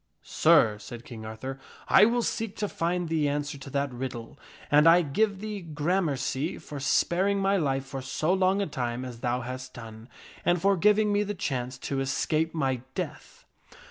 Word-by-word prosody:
" -, -, -47 dB
Sir," 105 Hz, -2 st, +4 dB
said 120 Hz, +2 st, -9 dB
King 110 Hz, -3 st, -8 dB
Arthur, 130 Hz, +5 st, -6 dB, 0.2 s
" -, -, -22 dB
I 205 Hz, -, +7 dB
will 240 Hz, +1 st, +1 dB
seek 225 Hz, -3 st, -2 dB
to 210 Hz, -, -2 dB
find 175 Hz, -1 st, -1 dB
the 155 Hz, -3 st, +1 dB
answer 145 Hz, 0 st, -3 dB
to 140 Hz, -, -9 dB
that 140 Hz, -1 st, -1 dB
riddle, 120 Hz, 0 st, -6 dB, 0.3 s
and 150 Hz, +2 st, +7 dB
I 175 Hz, +1 st, +6 dB
give 200 Hz, +7 st, 0 dB
thee 210 Hz, -2 st, -5 dB
gramercy 150 Hz, -3 st, -1 dB
for 150 Hz, -2 st, -8 dB
sparing 185 Hz, +8 st, +2 dB
my 195 Hz, 0 st, +2 dB
life 135 Hz, -5 st, 0 dB
for 135 Hz, 0 st, -6 dB
so 155 Hz, +6 st, 0 dB
long 190 Hz, +1 st, +2 dB
a -, -, -1 dB
time 125 Hz, -4 st, -3 dB
as 120 Hz, -2 st, -8 dB
thou 125 Hz, +1 st, -1 dB
hast 130 Hz, +1 st, -7 dB
done, 115 Hz, 0 st, -10 dB, 0.3 s
and 175 Hz, 0 st, +2 dB
for 195 Hz, +3 st, +3 dB
giving 210 Hz, +3 st, +3 dB
me 205 Hz, -, +2 dB
the 205 Hz, 0 st, -2 dB
chance 130 Hz, -7 st, -3 dB
to 135 Hz, -, -3 dB
escape 155 Hz, +4 st, 0 dB
my 135 Hz, -5 st, 0 dB
death." -, -, -6 dB
145 Hz, 190 wpm, -27 LUFS, 130-185 Hz, 0.3 s, I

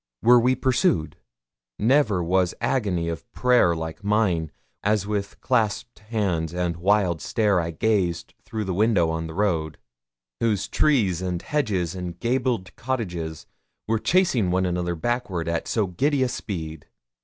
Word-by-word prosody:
Were 120 Hz, +1 st, +7 dB
we 125 Hz, +2 st, +3 dB
pursued? 120 Hz, -12 st, +1 dB, 0.6 s
Never 110 Hz, -5 st, +3 dB
was 90 Hz, +1 st, +1 dB
agony 95 Hz, -10 st, 0 dB
of 85 Hz, -1 st, -6 dB
prayer 125 Hz, -9 st, +3 dB
like 80 Hz, +3 st, -6 dB
mine, 100 Hz, -6 st, +1 dB, 0.3 s
as 105 Hz, -1 st, +1 dB
with 100 Hz, -1 st, -3 dB
clasped 115 Hz, -1 st, 0 dB
hands 100 Hz, -7 st, -2 dB
and 90 Hz, -1 st, -1 dB
wild 95 Hz, -2 st, +2 dB
stare 105 Hz, -5 st, +1 dB
I 85 Hz, 0 st, -2 dB
gazed 90 Hz, -1 st, 0 dB
through 110 Hz, -1 st, -4 dB
the 95 Hz, -2 st, -2 dB
windows 95 Hz, -4 st, +2 dB
on 80 Hz, 0 st, -3 dB
the 80 Hz, -, -8 dB
road, 80 Hz, -7 st, 0 dB, 0.6 s
whose 110 Hz, -4 st, 0 dB
trees 105 Hz, -, +2 dB
and 90 Hz, -2 st, -2 dB
hedges 100 Hz, -, -1 dB
and 90 Hz, -2 st, -6 dB
gabled 120 Hz, -5 st, -1 dB
cottages 90 Hz, -11 st, -4 dB, 0.4 s
were 110 Hz, 0 st, +1 dB
chasing 135 Hz, -, +2 dB
one 95 Hz, +1 st, +1 dB
another 90 Hz, -1 st, -1 dB
backward 95 Hz, -4 st, -2 dB
at 85 Hz, 0 st, -2 dB
so 110 Hz, -3 st, +1 dB
giddy 135 Hz, -, +1 dB
a 130 Hz, -, 0 dB
speed. 80 Hz, -10 st, -6 dB
95 Hz, 145 wpm, -24 LUFS, 85-115 Hz, 0.6 s, Were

